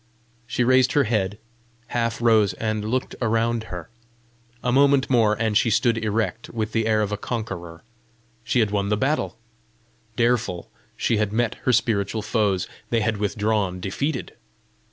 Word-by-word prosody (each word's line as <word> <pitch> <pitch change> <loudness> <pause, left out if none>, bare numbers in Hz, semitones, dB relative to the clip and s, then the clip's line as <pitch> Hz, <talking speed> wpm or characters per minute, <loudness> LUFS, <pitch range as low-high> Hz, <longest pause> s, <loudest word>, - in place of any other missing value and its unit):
She 125 - 0
raised 130 +1 +4
her 145 - +4
head, 105 -4 -1 0.5
half 115 -1 -1
rose, 110 -4 +4
and 110 +2 -2
looked 125 +4 -2
around 115 0 +1
her. 90 -6 -8 0.7
A 125 - +1
moment 140 0 +4
more, 110 -4 +4
and 110 -2 0
she 115 +1 +4
stood 115 +1 +3
erect, 110 +1 -2
with 110 -1 -3
the 110 0 0
air 110 -1 +3
of 105 - -3
a 105 - -1
conqueror: 90 -8 -5 0.6
she 115 +2 +2
had 105 -2 +1
won 100 -1 0
the 105 - +1
battle! 135 -2 -1 0.8
Dareful 115 -7 0 0.3
she 115 - +1
had 105 -1 0
met 115 +1 +1
her 130 - +4
spiritual 110 -3 +1
foes; 100 -4 0 0.2
they 115 -1 +1
had 110 0 0
withdrawn 105 -2 0
defeated! 130 +10 -3
110 Hz, 155 wpm, -23 LUFS, 105-120 Hz, 0.8 s, raised